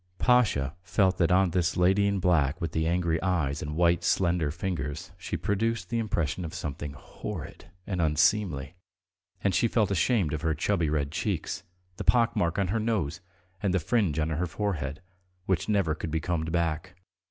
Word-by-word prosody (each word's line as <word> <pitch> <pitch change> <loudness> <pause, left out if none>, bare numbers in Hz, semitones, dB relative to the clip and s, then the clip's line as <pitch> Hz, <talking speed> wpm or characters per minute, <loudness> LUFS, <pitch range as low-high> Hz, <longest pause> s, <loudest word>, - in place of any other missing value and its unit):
Pasha 105 - +3
felt 95 -1 +1
that 85 0 +3
on 95 -1 +4
this 85 -1 0
lady 95 +3 +4
in 100 0 +1
black 80 -5 +2
with 85 -3 -3
the 80 0 0
angry 85 -1 +1
eyes 85 -7 0
and 75 0 -4
white 85 0 +3
slender 85 -4 +2
fingers 80 -1 -4
she 90 - -4
produced 115 +3 -1
the 115 - +1
impression 90 -6 -1
of 80 - -6
something 75 0 -5
horrid 70 - -8 0.2
and 90 -3 -2
unseemly, 80 -1 +2 0.7
and 100 - +2
she 115 - +3
felt 110 -3 +1
ashamed 100 - +2
of 75 - -2
her 80 -1 0
chubby 85 0 +1
red 75 -2 -1
cheeks, 95 +1 -2 0.4
the - - -4
pock 120 -2 +3
mark 85 +1 0
on 100 -3 +1
her 110 +4 +1
nose, 105 -10 -1 0.4
and 95 -3 +1
the - - +3
fringe 90 -2 +1
on 80 0 +1
her 80 +3 -1
forehead, 80 -4 -3 0.4
which 95 -1 0
never 100 -7 +2
could 80 - -5
be 80 +1 0
combed 80 0 -2
back. 85 +1 -1
85 Hz, 180 wpm, -28 LUFS, 80-95 Hz, 0.7 s, on